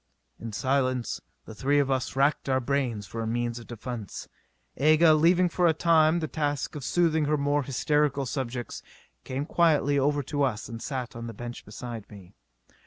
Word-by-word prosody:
In 115 - -6
silence 130 +1 0 0.2
the - - -9
three 140 +6 +1
of 140 -1 +2
us 130 0 -1
racked 140 +1 +2
our 130 0 +3
brains 125 -5 -1
for 115 +4 -6
a 110 - -2
means 120 +1 -2
of 120 - -12
defence. 120 -3 -7 0.5
Aga, 155 +3 +6
leaving 175 +4 +4
for 175 0 +2
a 160 - +3
time 160 0 +4
the 155 - -1
task 145 +1 -2
of 145 - -6
soothing 160 0 +2
her 150 +1 +1
more 145 +1 +1
hysterical 140 +1 +1
subjects, 125 -2 -4 0.4
came 135 +2 -3
quietly 150 -4 +3
over 145 +1 +1
to 145 +2 -3
us 120 -6 0
and 115 -1 -7
sat 130 -4 -4
on 115 0 -6
the 115 - -7
bench 120 +2 -7
beside 115 0 -8
me. 100 -2 -13
135 Hz, 180 wpm, -27 LUFS, 120-150 Hz, 0.5 s, Aga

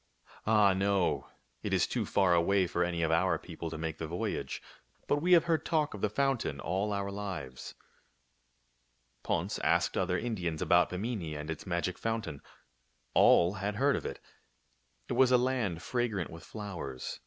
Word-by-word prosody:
Ah, 105 -3 +5
no. 95 -1 +1 0.3
It - - -3
is - - +3
too - - -2
far 95 -3 +3
away 95 +3 +3
for 85 0 0
any 85 -1 -1
of 80 - +1
our 85 +1 +3
peo 85 +1 -11
ple 85 - -4
to 80 - -6
make 80 0 -4
the 80 - -3
voyage. 85 +3 -3 0.5
But 145 - +2
we 175 +5 +3
have 170 - +7
heard 165 -2 +1
talk 155 -3 0
of 105 - -7
the 105 - +2
fountain 120 - 0
all 95 +7 -1
our 100 -1 -2
lives." 90 -11 -6 1.5
Ponce - - -1
asked - - +2
other 90 -1 +1
Indians 90 -9 -2
about 85 -3 +4
Bimini 90 -5 -3
and 75 +2 -5
its 80 - -7
magic 85 +1 -1
fountain. 110 -11 -3 0.7
All 85 +2 +6
had 105 +1 -2
heard 140 +5 +3
of - - -3
it. - - -6 0.9
It - - -2
was 130 -1 +4
a 125 - +7
land 120 -9 -1
fragrant 115 -8 -1
with 80 0 -9
flowers. 85 - -6
95 Hz, 175 wpm, -31 LUFS, 85-110 Hz, 1.5 s, have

